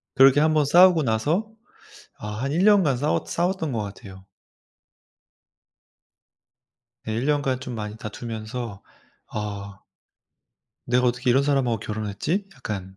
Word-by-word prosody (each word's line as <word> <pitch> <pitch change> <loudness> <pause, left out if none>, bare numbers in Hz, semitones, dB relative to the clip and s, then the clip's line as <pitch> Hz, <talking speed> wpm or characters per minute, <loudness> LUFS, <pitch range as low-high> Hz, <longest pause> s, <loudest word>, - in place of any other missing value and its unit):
그렇게 135 +1 +6
1 155 +1 +3
번 150 - +3
싸우고 175 +2 +6
나서 150 - 0 0.7
아 105 +3 -5
한 135 - -1
1 170 +5 +1
년간 190 -11 +4
싸워 145 +4 0
싸웠던 175 -3 -1
것 115 - -2
같아요. 95 -2 -10 2.8
네. 110 - -5
1 115 +5 -2
년간 140 -3 0
좀 125 -2 -6
많이 105 -1 -5
다투면서 110 0 -6 0.4
'아 100 -1 -6 1.1
내가 125 +1 +2
어떻게 125 +1 +1
이런 135 +3 +4
사람하고 135 -5 +1
결혼을 105 0 -4
했지?' 170 - -2
약간 95 -6 -6
125 Hz, 235 characters per minute, -24 LUFS, 105-145 Hz, 2.8 s, 그렇게